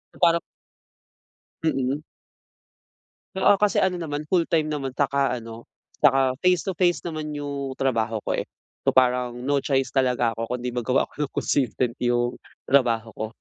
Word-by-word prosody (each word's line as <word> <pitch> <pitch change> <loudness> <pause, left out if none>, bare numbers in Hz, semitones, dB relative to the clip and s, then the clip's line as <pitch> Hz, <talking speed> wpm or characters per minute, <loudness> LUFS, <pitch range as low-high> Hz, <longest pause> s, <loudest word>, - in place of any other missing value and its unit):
Parang 170 -1 +4 1.2
Mm. 140 -1 0 1.3
Oo 195 +1 +4
kasi 210 -2 +3
ano 180 -2 0
naman, 150 -2 -3
full 175 -3 +3
time 155 -2 +1
naman 135 -3 -3
saka 140 -2 +1
ano, 115 -1 -9 0.3
saka 135 -2 +4
face 180 -2 +3
to 190 - -2
face 175 -2 +2
naman 155 -3 -4
yung 140 -2 -4
trabaho 115 -5 -1
ko - - -2
eh, - - -4 0.4
so - - +3
parang 125 -1 +3
no 140 +1 +2
choice 135 -1 0
talaga 125 -3 +2
ako 115 +2 -3
kundi 125 0 -4
magawa 125 +2 +1
ako 150 -1 -4
ng - - -40
consistent 125 -3 0
yung 120 0 0 0.2
trabaho 115 -5 +2
ko. 110 +1 -4
135 Hz, 150 wpm, -24 LUFS, 125-150 Hz, 1.3 s, Parang